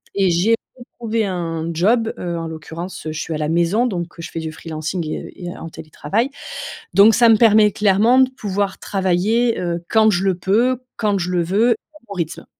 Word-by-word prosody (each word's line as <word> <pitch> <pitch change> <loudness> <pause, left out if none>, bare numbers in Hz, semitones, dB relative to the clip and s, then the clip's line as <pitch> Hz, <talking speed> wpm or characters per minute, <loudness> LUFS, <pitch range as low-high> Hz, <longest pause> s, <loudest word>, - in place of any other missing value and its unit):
Et 195 -2 +3
j'ai 185 +7 +3 0.2
retrouvé 230 -2 -3
un 165 -3 -3
job, 225 +7 +2
heu, 170 -1 -4
en 165 - -4
l'occurrence, 160 +2 -8
heu, - - -2
je 155 - -5
suis 165 - -4
à 155 - -2
la 150 0 -2
maison, 175 +9 +2
donc, 175 -5 -3
heu, - - -5
je - - -7
fais 165 - -4
du 160 -1 -5
freelancing 160 +2 -5
et - - -4
heu, - - -9
et 175 -1 -7
en 165 - -8
télétravail, 160 - -3 0.6
donc 205 +4 +7
ça 235 -2 +5
me 220 - +6
permet 215 -2 +5
clairement 210 +6 +3
de 260 -1 +5
pouvoir 200 -5 -3
travailler, 205 +5 +1
heu, 170 -1 -3
quand 220 -1 +4
je 190 -2 +1
le 190 -2 +2
peux, 230 +8 +1 0.2
quand 205 -3 +1
je 180 0 -2
le 175 -1 +1
veux, 210 +8 +2
à 305 +7 -5
mon - - -5
rythme. 165 -3 -4
190 Hz, 215 wpm, -20 LUFS, 170-220 Hz, 0.6 s, donc